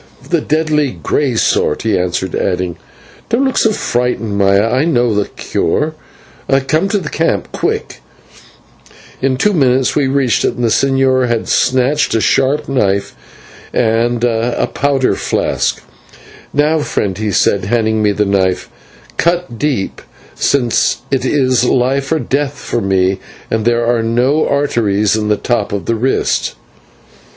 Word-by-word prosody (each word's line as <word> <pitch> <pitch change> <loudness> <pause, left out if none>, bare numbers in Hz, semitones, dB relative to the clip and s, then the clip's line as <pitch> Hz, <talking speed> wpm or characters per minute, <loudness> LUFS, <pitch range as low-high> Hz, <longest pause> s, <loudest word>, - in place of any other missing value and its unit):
"The 170 -3 +2
deadly 150 -3 0
grey 135 -5 0
sort," - - +1
he 110 -3 +1
answered, 90 0 -2
adding: 90 -2 -1 0.5
"Don't 235 +4 +2
look 265 - +1
so 225 - +3
frightened, 120 - -1
Maya, 100 +2 +3
I 130 +3 +2
know 120 -8 +2
a 100 - 0
cure. 150 - -1 0.7
Come 165 +7 +1
to 205 - +1
the 180 -6 -4
camp, 150 - -1
quick!" - - -3 1.2
In 130 -1 +1
two 210 +9 +2
minutes 130 -5 +2
we 145 -3 +2
reached 135 -3 +1
it, - - 0
and 120 - -4
the 115 - +2
señor 135 0 +2
had 120 -2 -1
snatched 130 +3 +1
a - - +3
sharp 135 +6 +1
knife 100 -7 0 0.6
and 120 +1 +1
a 120 0 0
powder 140 -2 +1
flask. - - -1 0.7
"Now, 150 +2 +2
friend," 100 -9 -2
he 105 +1 -2
said, 95 -1 +2
handing 110 0 +1
me 105 -1 +3
the 105 +1 0
knife, 95 -2 0 0.5
"cut 170 -9 0
deep, 135 -10 -2 0.3
since 125 -5 +1
it 135 - 0
is 130 -4 +2
life 135 +3 +1
or 160 - +3
death 145 -2 -2
for 120 - -3
me 95 -1 +1 0.3
and 110 -1 0
there 120 0 +2
are 120 -1 +1
no 125 +7 +1
arteries 110 -8 +1
in 110 -1 -1
the 105 0 +2
top 120 -4 -1
of 100 -1 -3
the 115 - 0
wrist." 125 +4 0
125 Hz, 150 wpm, -15 LUFS, 105-140 Hz, 1.2 s, so